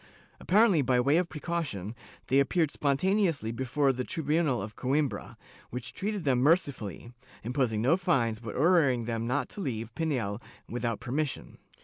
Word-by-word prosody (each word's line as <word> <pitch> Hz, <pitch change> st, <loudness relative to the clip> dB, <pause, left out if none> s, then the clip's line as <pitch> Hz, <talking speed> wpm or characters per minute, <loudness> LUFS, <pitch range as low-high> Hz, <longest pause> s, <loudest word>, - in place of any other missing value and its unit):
Apparently 200 Hz, -4 st, +4 dB
by 125 Hz, -1 st, +2 dB
way 140 Hz, +6 st, +3 dB
of 175 Hz, -1 st, 0 dB
precaution, 150 Hz, -, -4 dB, 0.3 s
they 135 Hz, -, +3 dB
appeared 155 Hz, +2 st, +2 dB
spon 140 Hz, -2 st, 0 dB
taneously 175 Hz, -, +1 dB
before 135 Hz, +2 st, +1 dB
the 125 Hz, 0 st, -3 dB
tribunal 150 Hz, -3 st, 0 dB
of 105 Hz, +2 st, -6 dB
Coimbra, 135 Hz, -4 st, -1 dB, 0.3 s
which 125 Hz, 0 st, -5 dB
treated 205 Hz, -1 st, -3 dB
them 130 Hz, -4 st, +2 dB
mercifully, 130 Hz, -, 0 dB, 0.3 s
imposing 120 Hz, -3 st, 0 dB
no 135 Hz, +7 st, +4 dB
fines 120 Hz, -, +1 dB
but 115 Hz, -2 st, -7 dB
ordering 140 Hz, -6 st, +3 dB
them 115 Hz, 0 st, -2 dB
not 135 Hz, +4 st, 0 dB
to 205 Hz, -, -7 dB
leave 115 Hz, -, -4 dB
Pinhel 125 Hz, -10 st, -2 dB, 0.3 s
without 115 Hz, -2 st, -2 dB
permission. 140 Hz, +4 st, -3 dB
135 Hz, 150 wpm, -29 LUFS, 120-160 Hz, 0.3 s, Apparently